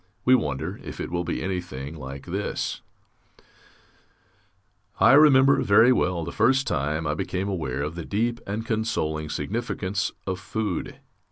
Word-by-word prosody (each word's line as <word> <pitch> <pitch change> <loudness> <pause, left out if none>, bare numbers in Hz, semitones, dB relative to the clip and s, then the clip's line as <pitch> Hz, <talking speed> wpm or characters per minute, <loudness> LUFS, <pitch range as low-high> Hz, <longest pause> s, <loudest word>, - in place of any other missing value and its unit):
We 130 - +6
wonder 80 - 0
if - - -8
it - - -4
will 85 0 -1
be 85 - -3
anything 85 -6 -4
like 70 -2 -8
this: 95 +4 -3 2.2
I - - +6
remember 140 -1 +6
very 110 +5 +6
well 90 -7 0
the 85 - -5
first 130 +1 +3
time 75 +1 -1
I - - 0
became 95 +2 -3
aware 80 -9 -2
of 75 +2 -3
the 85 0 -6
deep 115 +6 -1
and 105 +3 -3
consoling 80 -10 -1
significance 100 +3 -2
of 95 -1 -3
food. 100 -1 -3
95 Hz, 145 wpm, -25 LUFS, 80-110 Hz, 2.2 s, We